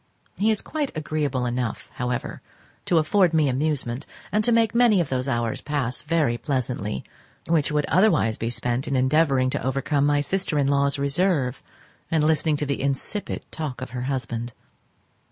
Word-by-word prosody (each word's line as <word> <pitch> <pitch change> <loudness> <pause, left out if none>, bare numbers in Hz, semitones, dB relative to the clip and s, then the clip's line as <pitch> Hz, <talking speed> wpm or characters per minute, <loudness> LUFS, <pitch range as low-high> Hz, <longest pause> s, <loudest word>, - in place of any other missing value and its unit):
He 210 +3 +3
is 215 -2 +1
quite 300 -3 -2
agreeable 150 -4 -1
enough, 120 -1 -3
however, 125 0 -3 0.4
to 175 - +3
afford 165 +2 +3
me 155 -2 +4
amusement, 135 -1 -1 0.2
and 210 +1 +2
to 240 - +3
make 230 -1 +3
many 235 -4 +5
of 170 - 0
those 130 0 -1
hours 120 -4 -1
pass 140 -5 -2
very 150 -7 +1
pleasantly 120 - -2 0.4
which 160 -3 +2
would 150 -1 +1
otherwise 185 - +3
be 115 - -3
spent 120 +1 -1
in 140 - -1
endeavouring 130 0 +3
to - - -2
overcome 140 +2 +1
my 145 0 +3
sister 185 0 -1
in 140 - +3
law's 140 0 +2
reserve, 140 -2 +1 0.5
and 160 -2 +2
listening 155 0 +2
to 150 - -1
the 140 0 -2
insipid 140 +9 -2
talk 150 -6 -4
of 130 -1 -6
her 125 0 -4
husband. 120 -3 -3
140 Hz, 170 wpm, -24 LUFS, 125-160 Hz, 0.5 s, many